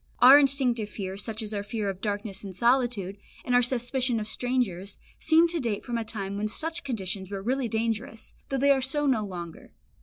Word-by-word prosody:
Our 260 +4 +9
instinctive 255 -6 +1
fears, 195 -1 -5
such 225 0 -3
as 215 0 -6
our 200 - -2
fear 210 0 -3
of 195 -1 -4
darkness 205 -1 -3
and 195 -2 -8
solitude, 235 -4 +1 0.3
and 250 - -1
our 245 - +6
suspicion 245 0 0
of 210 - -5
strangers, 220 -6 -2 0.2
seem 325 +1 +4
to 335 0 -1
date 230 -7 -2
from 235 -1 -2
a - - -2
time 200 -3 -5
when 210 +1 -1
such 325 +9 -2
conditions 195 - -3
were 195 -1 -5
really 255 +2 0
dangerous, 225 0 -3 0.2
though 270 - -1
they 280 +2 +4
are 270 -1 +3
so 290 +3 +1
no 255 -6 +2
longer. 175 -4 -8
225 Hz, 205 wpm, -27 LUFS, 200-260 Hz, 0.3 s, Our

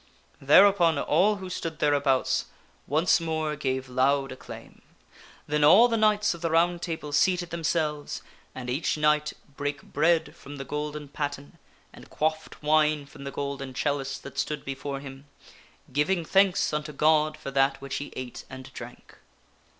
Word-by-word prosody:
Thereupon 170 +2 +6
all 185 +9 +3
who 190 -2 -8
stood 165 -3 -5
thereabouts 145 -3 +1 0.4
once 155 +6 +3
more 160 -2 -2
gave 130 -3 -2
loud 135 +2 +1
acclaim. 130 - -11 0.6
Then 150 0 0
all 195 +11 +8
the 230 - 0
knights 215 -2 +3
of 170 - -11
the 165 - 0
Round 170 +2 +2
Table 160 -4 -5
seated 175 +3 +2
themselves, 155 -3 -2 0.3
and 125 -1 -7
each 135 +5 -1
knight 150 0 +2 0.2
brake 145 0 -3
bread 165 +3 +1
from 145 +1 -11
the 135 -1 -7
golden 150 +1 -4
patten, 145 0 -5 0.3
and - - -14
quaffed 155 0 -3
wine 150 -1 +3
from 140 0 -12
the 140 - -4
golden 140 -2 -5
chalice 135 -1 -1
that 140 - -8
stood 150 -2 -3
before 135 0 -5
him, 135 0 -11 0.7
giving 160 +5 +1
thanks 190 -2 +3
unto 150 0 -2
God 155 +1 +2
for 140 -3 -7
that 135 0 +2
which 135 0 -5
he 145 - -6
ate 125 -2 -7
and 130 -1 -10
drank. - - -11
150 Hz, 155 wpm, -27 LUFS, 140-165 Hz, 0.7 s, all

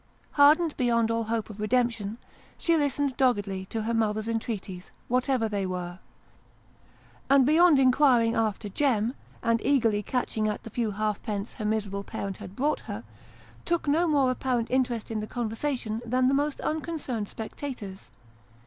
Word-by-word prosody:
Hardened 305 +3 +5
beyond 235 -2 +2
all 230 0 0
hope 225 0 -2
of 210 - -12
redemption, 225 -1 0 0.4
she 335 - +2
listened 285 -3 0
doggedly 205 -8 +1
to 220 +1 -3
her 230 +2 -1
mother's 215 -1 0
entreaties, 210 -5 -4 0.2
what 250 +3 0
ever 250 -4 +2
they 205 -2 -2
were: 180 -1 -4 1.3
and, 275 -2 +6
beyond 320 +2 +6
inquiring 255 -3 +4
after 215 -2 0
"Jem," 235 0 +1 0.3
and 230 -1 +2
eagerly 230 -7 +2
catching 220 -1 -1
at 210 - -3
the 225 - -9
few 230 -1 -1
halfpence 210 0 -3
her 215 - -6
miserable 205 -2 -1
parent 195 -1 -5
had 185 - -10
brought 295 +4 +1
her, - - -5 0.6
took 340 -3 -1
no 325 +5 +3
more 280 -5 +3
apparent 250 -2 -1
interest 245 -4 0
in 220 - -1
the 215 - -4
conversation 235 -1 -3
than 250 +2 +1
the 260 - +3
most 290 +1 0
un 315 0 -1
concerned 265 -10 -4
spectators. 220 - -7
230 Hz, 155 wpm, -27 LUFS, 215-270 Hz, 1.3 s, and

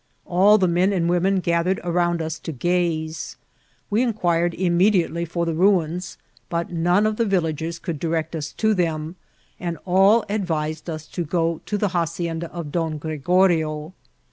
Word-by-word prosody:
All 195 +4 +5
the 190 -3 +2
men 175 +3 +2
and 175 -4 0
women 185 +2 +2
gathered 170 +2 +1
around 175 -1 0
us 160 0 -4
to - - -6
gaze. 160 +1 -1 0.5
We 215 +3 +3
inquired 175 -8 +1
immediately 175 -1 +2
for 170 +1 -2
the 165 - -1
ruins, 180 0 +1 0.3
but 170 0 -2
none 175 +4 +2
of 215 0 0
the 230 - +2
villagers 165 -3 -1
could 170 -4 -5
direct 165 0 -2
us 155 -1 -4
to 220 -1 +1
them, 165 -3 -1 0.4
and 170 -2 -3
all 195 +5 +4
advised 160 -6 -2
us 155 -1 -5
to 175 - -3
go 165 0 -1
to 210 - -1
the 205 -1 0
hacienda 170 -1 -2
of 170 -4 -6
Don 160 -2 -1
Gregorio. 160 0 +1
170 Hz, 160 wpm, -22 LUFS, 160-185 Hz, 0.5 s, All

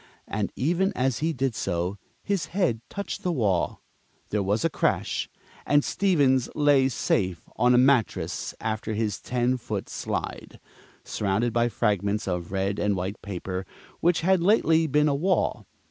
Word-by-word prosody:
And 105 -1 -2
even 175 +8 +1
as 130 -2 0
he 160 +2 +1
did 130 -3 -1
so, 90 -1 -2 0.2
his 195 -6 -1
head 170 - 0
touched 200 -2 -5
the 180 - 0
wall, 105 - 0 0.5
there 105 - 0
was 100 +2 0
a - - +3
crash, - - 0 0.3
and 145 0 +3
Stevens 140 -10 +2
lay 145 -3 +4
safe 90 -8 -1
on 125 0 +4
a - - +5
mattress 130 -3 +1
after 110 0 -3
his 105 -2 -1
ten 125 +1 0
foot 110 -4 -5
slide, - - -5 0.4
surrounded 105 +3 -1
by 120 0 +2
fragments 105 -2 0
of 90 -1 -3
red 95 +1 -1
and 105 -1 +1
white 95 +3 -4
paper 95 -1 -4 0.4
which 175 0 +2
had 185 +1 +3
lately 165 -4 +4
been 150 +1 +3
a 145 - +2
wall. 175 +5 0
120 Hz, 155 wpm, -26 LUFS, 100-150 Hz, 0.5 s, a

